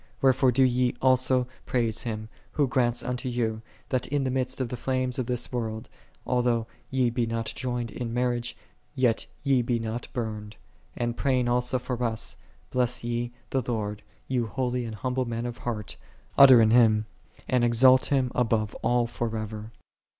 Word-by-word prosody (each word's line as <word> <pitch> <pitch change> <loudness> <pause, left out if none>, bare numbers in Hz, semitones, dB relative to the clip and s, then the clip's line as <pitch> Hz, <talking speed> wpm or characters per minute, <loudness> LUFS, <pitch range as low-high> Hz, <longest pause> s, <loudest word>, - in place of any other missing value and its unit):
Wherefore 130 -1 +4
do 130 +2 +3
ye 125 -1 +2
also 130 -1 +3 0.2
praise 115 -3 0
Him, 110 -3 -4 0.3
Who 145 -2 +2
grants 120 -1 +1
unto 125 0 -3
you, 115 -2 -1 0.3
that 130 -2 0
in 145 +1 0
the 130 - -1
midst 130 0 -2
of 130 -3 -1
the 125 - -3
flames 130 +1 -1
of 125 - -2
this 125 -1 -2
world, 110 -3 -4 0.4
although 120 -2 +1 0.2
ye 130 -2 +1
be 120 -1 0
not 115 -1 -2
joined 120 -3 -3
in 120 0 -4
mar 125 +1 +1
riage, 120 0 -3 0.4
yet 125 -4 +1 0.2
ye 135 -3 +3
be 120 0 0
not 115 +1 -4
burned: 110 -4 -5 0.4
and 120 -1 -1
praying 130 -1 +1
alsa 125 +1 +1
for 125 -1 -3
us, 115 -2 0 0.2
" - - -33
Bless 125 -1 +1
ye 120 0 -2 0.2
the 135 - +1
Lord, 105 -3 -3 0.3
ye 130 -1 0
holy 125 +1 -1
and 110 -1 -6
hum 125 +5 -3
ble 130 0 0
men 115 0 -3
of 120 -1 -5
heart; 110 -4 -4 0.4
utter 130 -4 +9
an 110 -1 +4
hymn, 110 -3 +5 0.4
and 125 -2 +2
exalt 130 +2 +5
Him 130 -3 +1
above 110 -4 +1
all 120 +1 +2
forever." 110 -2 -4
120 Hz, 180 wpm, -27 LUFS, 115-125 Hz, 0.4 s, utter